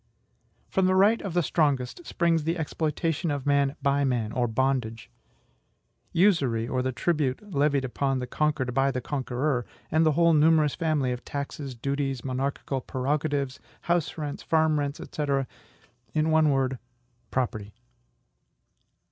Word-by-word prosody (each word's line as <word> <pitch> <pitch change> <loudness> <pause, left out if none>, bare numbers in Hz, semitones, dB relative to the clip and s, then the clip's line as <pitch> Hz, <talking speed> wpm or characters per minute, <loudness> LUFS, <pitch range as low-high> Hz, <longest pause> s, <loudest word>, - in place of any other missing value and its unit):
From 190 -1 +1
the 185 - +3
right 205 +4 +4
of 190 -4 -5
the 175 - +3
strongest 145 - 0
springs 165 -2 +1
the 165 +3 -1
exploitation 160 +1 -1
of 145 -2 -2
man 140 -1 +2
by 140 0 +2
man, 120 -5 0
or 125 -1 0
bondage; 115 -2 -1 1.0
usury, 140 - +2
or 130 0 -1
the 130 +1 -1
tribute 150 - -1
levied 140 -1 +2
upon 135 +1 -1
the 125 - -3
conquered 145 -1 -1
by 135 +2 +3
the 130 - -2
conqueror; 130 0 -1 0.3
and 160 +1 +4
the 155 -1 +3
whole 170 +2 +4
numerous 155 -1 +4
family 155 -6 0
of 125 0 -5
taxes, 140 -1 -5
duties, 135 0 -2
monarchical 135 +1 -2
prerogatives, 140 +1 -1 0.2
house 170 -3 0
rents, 150 -2 -4
farm 160 -2 +2
rents, 145 0 -3
&c. 150 - -2 0.9
in 155 +1 +2
one 155 -1 +4
word, 135 -2 0 0.5
property. 110 -5 -2
140 Hz, 140 wpm, -27 LUFS, 130-155 Hz, 1.0 s, right